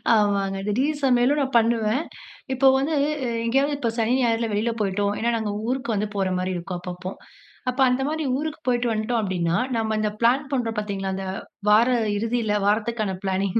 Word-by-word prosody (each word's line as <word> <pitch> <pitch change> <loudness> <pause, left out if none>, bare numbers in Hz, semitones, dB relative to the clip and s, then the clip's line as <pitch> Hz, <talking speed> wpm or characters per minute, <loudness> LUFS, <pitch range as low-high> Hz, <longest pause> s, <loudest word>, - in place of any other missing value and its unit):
ஆமாங்க, 200 -2 +1
திடீர் 280 +8 0
சமையலும் 255 +3 +3
நான் 265 -2 -2
பண்ணுவேன். 230 +4 +1 0.5
இப்போ 265 +1 +3
வந்து 285 +4 0
இ - - 0 0.4
எங்கேயாவது 275 +4 +1
இப்ப 235 -5 -1
சனி, 225 +2 +2
ஞாயிறுல 230 -1 +1
வெளியில 220 +3 0
போய்ட்டோம், 200 +1 0
ஏன்னா 235 +1 +1
நாங்க 215 -2 -2 0.2
ஊருக்கு 250 -3 -1
வந்து 210 +1 0
போற 195 -1 +1
மாதிரி 185 +1 -1
இருக்கும், 175 +1 -5
அப்பப்போ. 180 +1 -6 0.6
அப்போ, 260 +2 -1
அந்த 255 +2 +1
மாதிரி 315 +1 -2
ஊருக்கு 310 +1 -4
போய்ட்டு 245 -1 +2
வந்துட்டோம், 220 +2 0
அப்டீன்னா 175 -2 0 0.2
நம்ப 220 -1 0
அந்த 215 0 +1
பிளான் 255 +5 +3
பண்ணுறோம் 235 -4 -1
பாத்தீங்களா? 195 -2 -2
இந்த 195 - -4 0.4
வார 225 +4 +5 0.3
இறுதியில 230 -1 0
வாரத்துக்கான 215 0 0
பிளானிங் 190 +2 0
225 Hz, 170 wpm, -24 LUFS, 200-250 Hz, 0.6 s, வார